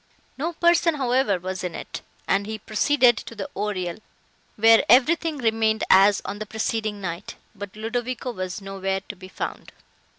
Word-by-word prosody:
No 325 +5 -3
person, 340 -1 +3
however, 255 -6 +1
was 185 +1 -5
in 180 - -4
it, - - -7 0.3
and 200 +1 +1
he 220 0 -4
proceeded 240 +3 +3
to 230 - -8
the 200 -3 -5
oriel, 185 -4 -3 0.6
where 225 +1 +6
everything 305 +6 +4
remained 225 -3 +1
as 195 +1 +6
on 205 - -5
the 215 - -5
preceding 220 -1 -2
night, 175 0 -6 0.2
but 205 -2 -9
Ludovico 245 +3 -3
was 185 -2 -5
nowhere 195 0 -3
to 205 - -7
be 185 0 -12
found. - - -6
215 Hz, 160 wpm, -24 LUFS, 195-245 Hz, 0.6 s, where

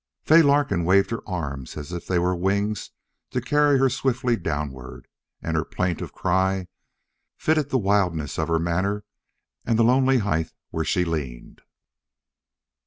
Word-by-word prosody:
Fay 165 +2 +7
Larkin 145 - +2
waved 95 +5 +3
her 115 - -2
arms 70 -8 -5
as 75 +2 -7
if 85 -1 -6
they 90 - +1
were 90 +1 +1
wings 100 +3 -1 0.4
to - - -1
carry 145 -1 +3
her 135 0 +4
swiftly 130 -2 0
downward, 75 - -5 0.4
and - - -2
her - - +1
plaintive 90 -2 -3
cry 95 0 0 0.7
fitted 155 -2 +1
the 135 - +2
wildness 95 - 0
of - - 0
her 85 -1 +2
manner 95 +5 -1 0.6
and 115 - +1
the 115 - +4
lonely 130 +2 +4
height 80 -8 -1 0.2
where 80 - -1
she 90 -3 +1
leaned. 70 -8 -5
95 Hz, 150 wpm, -24 LUFS, 85-125 Hz, 0.7 s, Fay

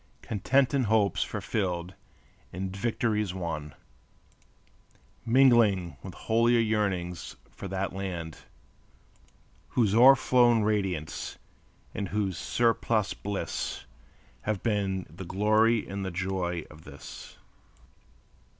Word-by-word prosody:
Content 130 +6 +1
in 135 -3 +2
hopes 105 -2 +2
fulfilled, 90 -3 -3 0.6
in 95 +1 -4
victories 105 -1 -1
won, 80 -5 -5 1.5
Mingling 115 - +4
with - - -9
holier 115 +1 +2
yearnings 100 -6 -1 0.2
for - - -8
that 95 0 -3
land, 90 -5 -5 1.3
Whose 110 -5 +1
o'er 130 +4 +8
flown 120 -4 +4
radiance 95 -7 -2 0.6
and 100 - -4
whose 100 -3 -1
surplus 115 +2 +1
bliss 100 -1 -4 0.6
Have 105 -3 -3
been 100 -4 0
the 85 +5 -10
glory 110 +5 +2
and 100 0 -4
the 95 - -2
joy 90 -2 -2
of 75 +1 -14
this. 70 0 -11
100 Hz, 100 wpm, -28 LUFS, 90-115 Hz, 1.5 s, o'er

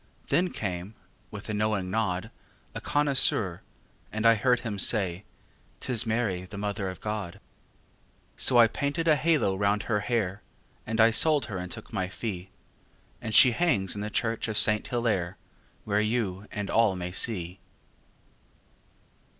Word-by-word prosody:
Then 180 +1 +1
came, 95 - -5 0.3
with 105 -1 -9
a 110 - -4
knowing 105 -3 -1
nod, 95 -4 -2 0.4
A - - -6
connoisseur, 130 -11 +3 0.5
and 110 +1 -3
I 115 - +7
heard 125 +2 +1
him 105 -4 -5
say; 95 -3 +2 0.5
"'Tis 120 -3 +1
Mary, 110 -5 -1
the 100 - -10
Mother 100 -1 -3
of 95 - -9
God." 105 -3 -5 1.0
So 125 - +3
I 120 - +8
painted 145 +8 -3
a 155 - +5
halo 150 -9 +1
round 100 +2 0
her 105 -3 -1
hair, 105 -3 -2 0.5
And 110 0 -3
I 115 +1 +6
sold 150 +2 +3
her 95 -4 -6
and 90 0 -7
took - - -10
my 95 -1 -2
fee, 95 -3 -6 0.7
And 110 -1 -3
she 130 - +8
hangs 115 - 0
in 105 - -6
the 105 - -4
church 115 +1 -2
of 110 -2 -2
Saint 105 +1 +6
Hillaire, 115 -8 -2 0.5
Where 105 0 +1
you 105 -3 -2
and 105 -4 -5
all 115 -4 +2
may 90 -1 -5
see. 90 -2 -2
105 Hz, 155 wpm, -27 LUFS, 95-115 Hz, 1.0 s, I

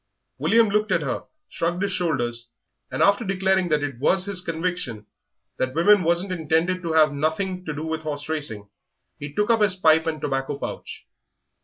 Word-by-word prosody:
William 230 0 +4
looked 210 +1 +1
at - - +2
her, - - -3 0.2
shrugged 175 +3 -2
his 200 - 0
shoulders, 120 -10 -1 0.4
and, - - 0
after 200 +3 +4
declaring 190 -2 +1
that 150 -2 +1
it 140 -4 -4
was 185 +7 +2
his 200 -3 -1
conviction 165 - -3 0.5
that 130 +1 -2
women 200 +5 +5
wasn't 175 +3 +1
intended 170 +2 0
to 165 -2 -3
have 155 -2 +4
nothing 170 +6 -2
to 155 - -3
do 150 +1 -5
with 160 0 -3
horse 145 -2 -5
racing, 145 -10 -3 0.5
he 145 0 -6
took 210 +8 +1
up 225 -1 +3
his 205 -3 +4
pipe 160 -2 +4
and 155 -1 -2
tobacco 140 -1 -2
pouch. - - -7
165 Hz, 180 wpm, -24 LUFS, 145-185 Hz, 0.5 s, women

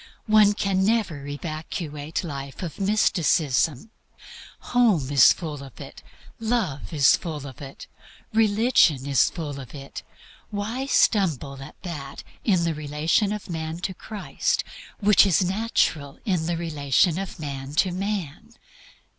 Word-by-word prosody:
One 215 -2 +5
can 195 -2 +1
never 195 -10 0
evacuate 155 +1 -5
life 140 -1 -6
of 170 +1 -6
mysticism. 170 - +1 0.8
Home 205 - +3
is 135 -4 +7
full 155 -5 -4
of 135 -3 -12
it, - - -10 0.4
love 220 - -1
is 145 -4 +5
full 155 -4 -6
of 135 -1 -10
it, 135 -1 -9 0.5
religion 215 - +3
is 140 -3 +3
full 145 -5 -6
of 130 +1 -10
it. 140 -1 -8 0.5
Why 225 +6 -3
stumble 155 - +2
at 135 - -11
that 145 -6 -7 0.2
in 185 -6 +2
the 165 -1 0
relation 155 +7 0
of 210 -2 -5
man 160 -1 -4
to 190 - -2
Christ 205 +2 -2 0.4
which 210 -1 +6
is 185 0 +3
natural 185 -8 0
in 180 -6 0
the 170 -1 -1
relation 160 +1 +1
of 195 -2 -6
man 140 -1 -6
to 185 +4 +3
man? 200 +2 -4
165 Hz, 135 wpm, -24 LUFS, 145-200 Hz, 0.8 s, is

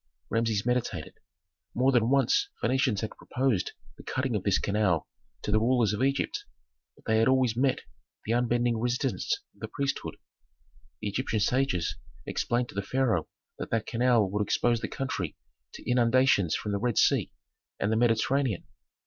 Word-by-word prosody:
Rameses 115 -2 +1
meditated. 120 -10 -2 0.6
More 130 +3 +3
than 120 -3 +3
once 140 - +3
Phœnicians 130 -5 +1
had 110 - -3
proposed 125 -7 -1 0.2
the - - -12
cutting 130 -2 -1
of 105 - 0
this 100 0 +2
canal 100 -6 +1 0.4
to - - -2
the 110 - +4
rulers 115 -2 +2
of 105 - -2
Egypt, 135 +1 0 0.5
but - - -24
they 110 0 +2
had 115 - +4
always 130 -3 +3
met 130 +2 +1 0.4
the 110 - -2
unbending 120 -1 +1
resistance 125 +2 0 0.2
of - - -27
the - - -5
priesthood. 140 -1 -3 0.9
The 105 - -2
Egyptian 110 +1 -1
sages 125 -7 +1 0.3
explained 120 +1 -1
to - - -12
the 100 - 0
pharaoh 110 -6 0 0.3
that - - -5
that 115 -1 0
canal 120 -3 +3
would 105 +1 0
expose 120 +2 +1
the - - -2
country 100 - -3 0.4
to - - -11
inundations 125 -7 +3
from 105 - -3
the 100 - 0
Red 120 -1 -1
Sea - - +3 0.5
and 100 - 0
the - - +2
Mediterranean. 120 0 +1
120 Hz, 165 wpm, -28 LUFS, 105-130 Hz, 0.9 s, the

